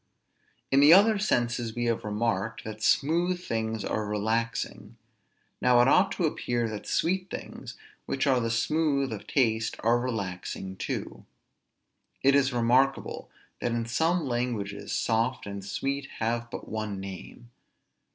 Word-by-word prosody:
In 135 Hz, -, +5 dB
the 145 Hz, +3 st, +8 dB
other 205 Hz, +3 st, +6 dB
senses 120 Hz, -, 0 dB
we 120 Hz, 0 st, -1 dB
have 115 Hz, -1 st, 0 dB
remarked, 105 Hz, 0 st, -2 dB
that 110 Hz, 0 st, -7 dB
smooth 170 Hz, +8 st, +2 dB
things 110 Hz, -, -3 dB
are 110 Hz, -, -1 dB
relaxing. 110 Hz, +3 st, -2 dB, 0.6 s
Now 125 Hz, -1 st, +5 dB
it -, -, +3 dB
ought 185 Hz, +7 st, +4 dB
to 180 Hz, -, 0 dB
appear 120 Hz, -6 st, -1 dB
that 105 Hz, -1 st, -7 dB
sweet 185 Hz, +2 st, 0 dB
things, -, -, -8 dB, 0.3 s
which 135 Hz, +1 st, 0 dB
are 130 Hz, -3 st, +3 dB
the 115 Hz, -1 st, -1 dB
smooth 140 Hz, +2 st, +1 dB
of 105 Hz, -, -8 dB
taste, 115 Hz, -4 st, +1 dB
are 120 Hz, +1 st, +3 dB
relaxing 95 Hz, -5 st, -4 dB
too. 95 Hz, -, -5 dB, 1.0 s
It 135 Hz, +1 st, +5 dB
is 135 Hz, -1 st, +3 dB
remarkable, 125 Hz, +3 st, +1 dB, 0.3 s
that 120 Hz, -, -1 dB
in 115 Hz, -1 st, -1 dB
some 160 Hz, +8 st, +1 dB
languages 120 Hz, -5 st, -3 dB
soft 115 Hz, +3 st, 0 dB
and 100 Hz, -1 st, -6 dB
sweet 135 Hz, +7 st, -3 dB
have 115 Hz, +1 st, -1 dB
but -, -, -7 dB
one 110 Hz, -2 st, -4 dB
name. 95 Hz, +5 st, -9 dB
120 Hz, 140 wpm, -28 LUFS, 110-135 Hz, 1.0 s, the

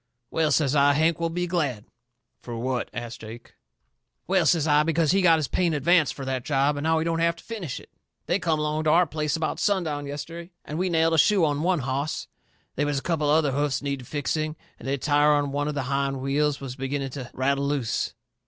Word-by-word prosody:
"Well," 160 Hz, -2 st, +1 dB
says 140 Hz, -2 st, +2 dB
I, 145 Hz, 0 st, +5 dB
"Hank 160 Hz, +3 st, +2 dB
will 165 Hz, 0 st, 0 dB
be 175 Hz, +2 st, -2 dB
glad." 150 Hz, -, -1 dB, 0.6 s
"Fur 120 Hz, -, -7 dB
what?" 125 Hz, +2 st, -2 dB
asts 120 Hz, -1 st, -6 dB
Jake. 115 Hz, +2 st, -11 dB, 0.7 s
"Well," 185 Hz, -3 st, +2 dB
says 160 Hz, -1 st, +3 dB
I, 150 Hz, -1 st, +4 dB
"because 160 Hz, -1 st, +2 dB
he 195 Hz, -, +3 dB
got 165 Hz, -3 st, +5 dB
his 155 Hz, -3 st, -1 dB
pay 180 Hz, +6 st, +1 dB
in 165 Hz, -, 0 dB
advance 160 Hz, +2 st, +3 dB
fur 135 Hz, -, -7 dB
that 130 Hz, -2 st, -2 dB
job 140 Hz, +1 st, +1 dB
and 145 Hz, +2 st, -4 dB
now 160 Hz, 0 st, +3 dB
he 160 Hz, -, 0 dB
don't 165 Hz, 0 st, 0 dB
have 170 Hz, 0 st, +2 dB
to 170 Hz, -, -16 dB
finish 200 Hz, -, -5 dB
it. -, -, -17 dB, 0.3 s
They 180 Hz, -, +1 dB
come 165 Hz, -4 st, +1 dB
along 150 Hz, +1 st, -1 dB
to -, -, +3 dB
our 170 Hz, +3 st, +5 dB
place 150 Hz, 0 st, -2 dB
about 160 Hz, -1 st, -2 dB
sundown 160 Hz, -8 st, 0 dB
yesterday, 165 Hz, +5 st, -7 dB
and 155 Hz, +3 st, -5 dB
we 185 Hz, 0 st, +1 dB
nailed 165 Hz, -1 st, +2 dB
a 160 Hz, -, +4 dB
shoe 195 Hz, 0 st, +4 dB
on 145 Hz, -1 st, 0 dB
one 175 Hz, -2 st, +1 dB
hoss. 135 Hz, +4 st, -2 dB, 0.5 s
They 145 Hz, -, +1 dB
was 145 Hz, -1 st, 0 dB
a 135 Hz, -, -3 dB
couple 155 Hz, -4 st, 0 dB
of 150 Hz, -, +5 dB
other 155 Hz, -3 st, +2 dB
hoofs 145 Hz, 0 st, -1 dB
needed 140 Hz, -3 st, -3 dB
fixing, 155 Hz, +1 st, -2 dB, 0.2 s
and -, -, -9 dB
the 140 Hz, +1 st, 0 dB
tire 145 Hz, +2 st, +3 dB
on 145 Hz, -1 st, +1 dB
one 145 Hz, +1 st, -1 dB
of 150 Hz, -, -3 dB
the 140 Hz, -, -1 dB
hind 135 Hz, 0 st, -1 dB
wheels 140 Hz, +2 st, 0 dB
was 135 Hz, -2 st, -6 dB
beginning 135 Hz, 0 st, -3 dB
to 130 Hz, -3 st, -7 dB
rattle 140 Hz, +2 st, 0 dB
loose." 140 Hz, -6 st, -1 dB
150 Hz, 235 wpm, -25 LUFS, 140-165 Hz, 0.7 s, I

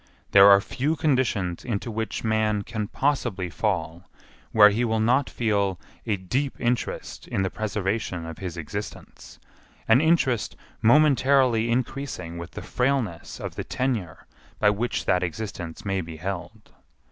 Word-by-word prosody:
There 100 Hz, 0 st, +9 dB
are 100 Hz, 0 st, +8 dB
few 135 Hz, +9 st, -1 dB
conditions 125 Hz, -, 0 dB
into 115 Hz, -1 st, -3 dB
which 110 Hz, -1 st, -3 dB
man 110 Hz, -2 st, +1 dB
can 110 Hz, -2 st, -4 dB
possibly 120 Hz, -, -1 dB
fall 90 Hz, -4 st, -2 dB, 0.4 s
where 105 Hz, -1 st, +7 dB
he 115 Hz, +4 st, 0 dB
will 110 Hz, -2 st, +1 dB
not 125 Hz, +5 st, +2 dB
feel 100 Hz, -5 st, 0 dB, 0.3 s
a 105 Hz, -3 st, +1 dB
deep 130 Hz, +10 st, -2 dB
interest 120 Hz, 0 st, -2 dB
in 95 Hz, -, -1 dB
the 95 Hz, -, -1 dB
preservation 100 Hz, -4 st, -2 dB
of 80 Hz, +1 st, -8 dB
his 90 Hz, -3 st, -5 dB
existence; 80 Hz, -3 st, -7 dB, 0.5 s
an 115 Hz, +4 st, +6 dB
interest 160 Hz, -8 st, +2 dB, 0.3 s
momentarily 130 Hz, -3 st, +4 dB
increasing 120 Hz, -8 st, -3 dB
with 85 Hz, +1 st, -7 dB
the -, -, -7 dB
frailness 125 Hz, -9 st, -1 dB
of -, -, -5 dB
the -, -, -5 dB
tenure 115 Hz, -, -3 dB, 0.3 s
by 105 Hz, -, +4 dB
which 115 Hz, +4 st, -2 dB
that 90 Hz, -, +2 dB
existence 90 Hz, +1 st, -5 dB
may 95 Hz, -1 st, 0 dB
be 80 Hz, -1 st, -8 dB
held. 100 Hz, +5 st, -6 dB
110 Hz, 145 wpm, -25 LUFS, 95-125 Hz, 0.5 s, There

